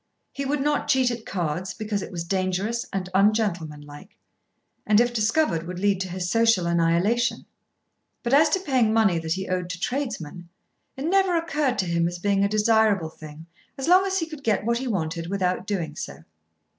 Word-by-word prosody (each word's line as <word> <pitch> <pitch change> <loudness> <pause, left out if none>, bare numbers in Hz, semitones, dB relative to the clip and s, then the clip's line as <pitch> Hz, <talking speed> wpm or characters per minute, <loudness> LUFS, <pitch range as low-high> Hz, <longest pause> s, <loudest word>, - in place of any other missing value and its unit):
He 275 - -4
would 280 +1 -1
not 295 +1 0
cheat 260 -2 +3
at 230 -2 -7
cards 180 +1 -3
because 215 -2 -3
it - - -7
was 170 -2 -4
dangerous 190 +5 -1
and 190 -2 -3
ungentlemanlike, 180 -6 -1 0.7
and 210 0 +4
if 240 0 +2
discovered 215 - +1
would 180 0 -6
lead 200 0 +1
to 190 - -3
his 180 0 -3
social 225 -3 +3
annihilation; 170 +8 +1 0.8
but 240 +1 -1
as 300 +2 +6
to 380 - +1
paying 255 - +2
money 205 -7 +3
that 160 0 -2
he 190 +1 -4
owed 180 -1 -2
to 180 -1 -5
tradesmen, 180 - -4 0.5
it 270 - -4
never 380 0 +3
occurred 300 -5 0
to 190 - 0
him 170 -1 +1
as 175 +1 -4
being 200 +2 +1
a 200 - +2
desirable 215 -5 +2
thing 155 0 -11 0.3
as 270 - -4
long 365 +2 +6
as 385 0 -1
he 330 - 0
could 310 -3 -10
get 210 -2 +1
what 235 +1 +1
he 260 - -4
wanted 165 -5 -2
without 185 0 -1
doing 170 -7 -3
so. 70 - -7
200 Hz, 190 wpm, -24 LUFS, 175-240 Hz, 0.8 s, as